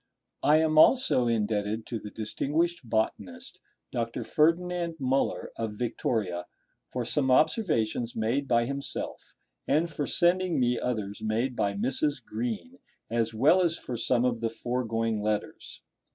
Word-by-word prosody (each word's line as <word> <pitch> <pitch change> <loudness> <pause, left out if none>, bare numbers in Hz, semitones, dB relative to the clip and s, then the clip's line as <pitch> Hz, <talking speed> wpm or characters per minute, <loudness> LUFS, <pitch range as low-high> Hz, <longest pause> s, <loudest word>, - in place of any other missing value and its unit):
I 150 +1 +5
am 155 -1 +3
also 200 - +5
indebted 110 -1 0
to 115 - -4
the 105 - -8
distinguished 150 - -1
botanist, 185 - -2 0.3
Dr. 115 -2 -2
Ferdinand 170 +2 +1
Müller, 135 0 0
of 110 -2 -3
Victoria, 110 -6 -2 0.4
for 125 -2 -2
some 135 +2 +1
observations 125 - +2
made 120 +6 0
by 120 -1 +3
himself, 140 +2 -5 0.3
and 160 +4 +2
for 145 -2 -3
sending 180 -1 +2
me 125 -1 +2
others 105 -4 -3
made 115 +4 -1
by 100 -3 0
Mrs. 130 +4 -1
Green, 105 -7 -4 0.3
as 115 -1 0
well 155 +11 +5
as 170 -2 +1
for 125 - -6
some 120 +1 +1
of 120 -2 0
the 115 - 0
foregoing 115 -2 -2
letters. 105 0 -3
120 Hz, 140 wpm, -28 LUFS, 110-150 Hz, 0.4 s, I